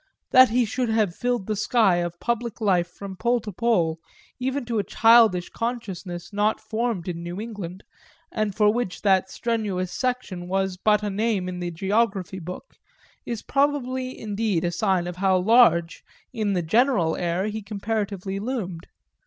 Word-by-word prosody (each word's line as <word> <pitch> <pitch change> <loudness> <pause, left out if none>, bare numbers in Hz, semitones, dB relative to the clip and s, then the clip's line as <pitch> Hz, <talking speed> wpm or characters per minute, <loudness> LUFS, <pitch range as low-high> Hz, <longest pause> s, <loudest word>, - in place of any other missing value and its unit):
That 255 0 +8
he 240 +2 +2
should 245 +2 -2
have 215 -5 +1
filled 245 -1 -1
the 215 - -1
sky 215 -3 +3
of 175 0 -3
public 235 -1 -2
life 185 -5 +2
from 190 +2 -9
pole 240 +5 +1
to 210 - -6
pole, 175 -7 +1 0.4
even 265 +1 -2
to 230 -2 -1
a - - 0
childish 225 -6 +5
consciousness 190 -7 -5
not 210 +2 +1
formed 225 -5 -2
in 170 -2 -4
New 175 +2 -6
England 205 -5 -7 0.5
and 215 -3 -1
for 210 -1 +4
which 235 -6 -3
that 190 -2 +3
strenuous 205 -6 -2
section 250 -9 -3
was 190 0 0
but 210 +3 +2
a 205 - -1
name 205 -2 0
in 180 -1 -5
the 175 -1 -3
geography 195 +1 -1
book, 180 - -9 0.5
is 235 -3 -4
probably 260 -2 0
indeed 205 -4 -1
a 175 - 0
sign 185 0 +1
of 175 0 -6
how 190 0 +3
large, 185 -4 +4 0.3
in 215 -4 0
the 180 -2 0
general 210 - +2
air, 175 +2 -1
he 215 +1 -3
comparatively 200 -2 -3
loomed. 200 -7 -4
205 Hz, 165 wpm, -24 LUFS, 180-230 Hz, 0.5 s, That